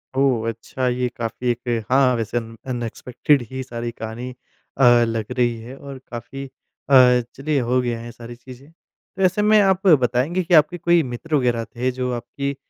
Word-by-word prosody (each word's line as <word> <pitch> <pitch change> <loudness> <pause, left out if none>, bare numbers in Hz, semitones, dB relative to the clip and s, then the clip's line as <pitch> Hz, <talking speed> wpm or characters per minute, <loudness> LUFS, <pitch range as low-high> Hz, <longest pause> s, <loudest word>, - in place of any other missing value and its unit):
ओह! 130 -4 +2
अच्छा 125 +3 -4
ये 125 0 0
काफ़ी 120 +2 -4
एक 120 -2 -3
हाँ 130 -1 +4
वैसे 115 +1 -2
अन 115 -1 -5
अनएक्सपेक्टेड 125 +3 0
ही 130 0 -4
सारी 120 -2 -5
कहानी 115 +3 -7 0.5
अ, 135 - +2 0.2
लग 115 0 -3
रही 120 -1 +2
है 125 +4 -10
और 140 -1 -9
काफ़ी 130 +4 -7
अ, 130 -1 +3
चलिए 145 +1 -1
हो 125 +1 +1
गया 120 -2 -2
है 115 - -9
ये 120 - -8
सारी 120 0 -10
चीज़ें। 130 +3 -14
तो 185 +3 -14
ऐसे 185 +3 +2
में 215 +1 +5
आप 190 0 +2
बताएँगे 140 +4 +3
कि 175 - -2
आपके 160 +3 +5
कोई 170 0 +3
मित्र 135 +5 -4
वगैरह 120 -4 +1
थे 125 +2 0
जो 125 0 -3
आपकी 140 +3 -4
125 Hz, 185 wpm, -21 LUFS, 120-140 Hz, 0.5 s, में